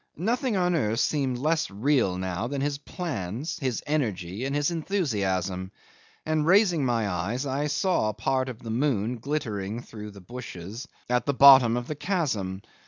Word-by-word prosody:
Nothing 230 - 0
on 180 -1 +2
earth 115 -8 +1
seemed 135 -5 +1
less 155 +5 +1
real 110 -2 +1
now 95 +4 -2
than 140 +2 -3
his 140 0 -1
plans, 140 - -4
his 130 -5 -2
energy, 110 - -2
and 135 +1 -2
his 145 +2 +1
enthusiasm; 100 - -1 0.5
and 155 -1 +1
raising 180 -2 +4
my 115 -4 +1
eyes, 100 - -2
I 140 +2 -1
saw 155 - +1
part 130 +5 -1
of 120 -3 -9
the 115 - -4
moon 120 -2 0
glittering 115 -6 -3
through 105 -3 -9
the 100 -1 -12
bushes 115 - -8 0.2
at 125 +2 0
the 140 - +1
bottom 130 -4 +8
of 125 - -3
the - - -2
chasm. 130 - -2
125 Hz, 165 wpm, -27 LUFS, 105-150 Hz, 0.5 s, bottom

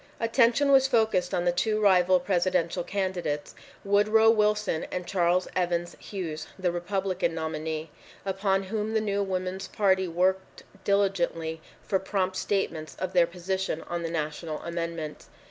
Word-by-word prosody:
Attention 235 +4 +3
was 270 -1 +6
focussed 220 -8 +2
on 175 - 0
the 175 - +4
two 215 +5 0
rival 185 -3 +5
presidential 180 -1 0
candidates, 180 -6 -2 0.3
Woodrow 215 +3 +5
Wilson 210 -6 +1
and 180 -1 -4
Charles 180 0 +1
Evans 175 -1 -1
Hughes, 165 -6 -5
the 185 -2 0
Republican 185 -1 -1
nominee, 160 -1 -4 0.3
upon 195 0 0
whom 215 +2 -3
the - - +4
new 200 -2 -1
Woman's 185 -1 -3
Party 190 -2 +2
worked 185 +3 0 0.2
diligently 175 -5 0 0.2
for 190 - 0
prompt 190 -1 -1
statements 160 -7 -2
of 185 0 -3
their 175 -2 +5
position 180 -1 -3
on 175 0 -4
the 165 - -3
national 155 0 -3
amendment. 170 -2 -4
185 Hz, 140 wpm, -27 LUFS, 170-200 Hz, 0.3 s, was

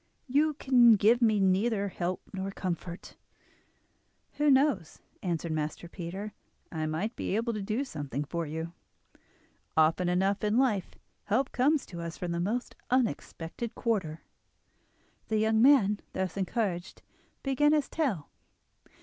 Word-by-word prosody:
"You 295 +3 +2
can 245 -5 +6
give 225 +5 +4
me 220 -3 +4
neither 200 +2 +2
help 180 0 -3
nor 190 0 -3
comfort." 180 -2 -5 1.2
"Who 295 0 +3
knows?" 265 - +2 0.2
answered 170 -2 -2
Master 155 +2 -3
Peter. 190 +4 -6 0.4
"I 155 -2 -2
might 185 +10 -2
be - - -2
able 230 +2 0
to 210 - -3
do 215 +7 -1
something 145 - -4
for 165 +2 -3
you. 160 +2 -5 1.0
Often 160 +3 +3
enough 195 +3 +1
in 210 +2 +2
life 220 -8 +1 0.3
help 250 +6 +1
comes 285 +3 +2
to 170 -2 -8
us 170 0 -6
from 180 -1 -3
the 170 - -1
most 225 +8 -2
unexpected 235 -4 -2
quarter." 185 -9 -1 1.1
The 220 - 0
young 220 +1 +3
man, 225 -6 +5
thus 190 -2 -2
encouraged, 190 -2 -2 0.4
began 290 +2 +3
his 300 -3 +2
tale. 245 - -1
200 Hz, 135 wpm, -29 LUFS, 170-240 Hz, 1.2 s, can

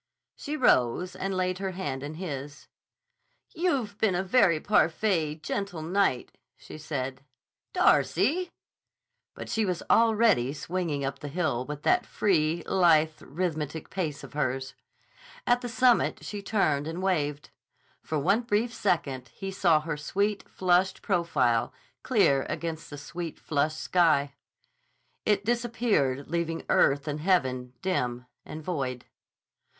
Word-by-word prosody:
She 300 +1 -5
rose 180 - +2
and 195 -1 -3
laid 185 0 -1
her 190 -1 -3
hand 145 -8 -4
in 145 +2 -6
his. 145 -5 -6 0.9
"You've 270 - -1
been 210 -5 +2
a 185 - 0
very 190 -5 +4
parfait, 170 -4 +1
gentil 190 -5 -3
knight," 180 -6 0 0.3
she - - -11
said. 135 -3 -4 0.5
"Darcy!" 360 +4 +2 0.9
But - - -7
she 220 - 0
was 180 -4 -2
already 220 - +4
swinging 155 -2 -3
up 135 - -4
the 145 - -6
hill 145 -6 -1
with 150 +1 -7
that - - +2
free, 165 -4 +1
lithe, 160 -4 +3
rhythmic 155 -2 -4
pace 155 -7 -3
of 135 - -11
hers. 135 -2 -2 0.7
At 245 0 +3
the 245 - -4
summit 250 0 +2
she 205 -1 -5
turned 155 -9 +1
and 170 +3 -4
waved. 150 -6 -1 0.5
For 155 - -3
one 195 +10 +2
brief 230 +1 0
second 145 - -1
he 195 0 -5
saw 170 -5 +3
her 155 -1 -4
sweet, 200 +7 -1
flushed 185 +1 +1
profile 130 - +1 0.3
clear 195 - +2
against 165 -1 -4
the 145 - -8
sweet, 170 +3 -6
flushed 155 +1 -1
sky. 155 -6 +2 0.9
It 205 -1 +2
disappeared 225 - 0
leaving 165 0 -2
earth 140 +2 +3
and 150 0 -2
heaven 130 -8 0
dim 125 -10 -1 0.2
and 155 +1 -8
void. 135 -7 -3
165 Hz, 135 wpm, -28 LUFS, 145-195 Hz, 0.9 s, very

